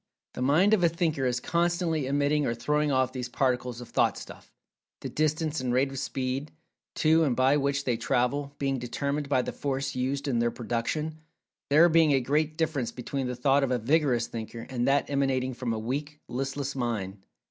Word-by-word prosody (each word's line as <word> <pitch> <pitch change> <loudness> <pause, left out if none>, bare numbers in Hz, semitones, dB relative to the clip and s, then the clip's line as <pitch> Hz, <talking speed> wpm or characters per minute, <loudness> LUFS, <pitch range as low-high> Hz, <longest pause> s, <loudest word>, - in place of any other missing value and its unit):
The - - -6
mind 160 +11 +4
of 200 -5 +3
a 170 - +5
thinker 160 -5 0
is 125 0 0
constantly 170 -1 0
emitting 145 +1 +1
or 115 - -1
throwing 150 +5 0
off 130 -1 +1
these 125 -2 -4
particles 125 -2 -1
of 120 - -10
"Thought - - +2
stuff"; - - -11 0.5
the - - -4
distance 155 0 0
and 125 -1 -1
rate 130 +2 +2
of 135 - -5
speed, 130 +3 -3 0.5
to 160 +1 +4
and 135 -6 +1
by 130 +3 +4
which 140 0 0
they 125 -4 0
travel, 140 +5 0
being 135 -2 -1
determined 140 +4 -3
by 130 -3 +2
the - - -5
"force" 135 -1 -2
used 135 +3 -2
in 125 -4 +1
their 120 0 +2
production, 125 +7 -3 0.5
there 155 +4 +7
being 160 -3 +4
a 135 - +4
great 150 +4 0
difference 155 -7 -1
between 130 +2 -4
the 125 - -3
thought 135 +3 +3
of 135 - +1
a 125 - +1
vigorous 125 -1 +2
thinker, 115 0 -7
and 125 -1 -1
that 140 +1 +2
emanating 135 -2 0
from 125 -1 -3
a 115 - -1
weak, 145 +7 -4
listless 135 +2 -3
mind. 105 -6 -3
135 Hz, 195 wpm, -28 LUFS, 125-150 Hz, 0.5 s, there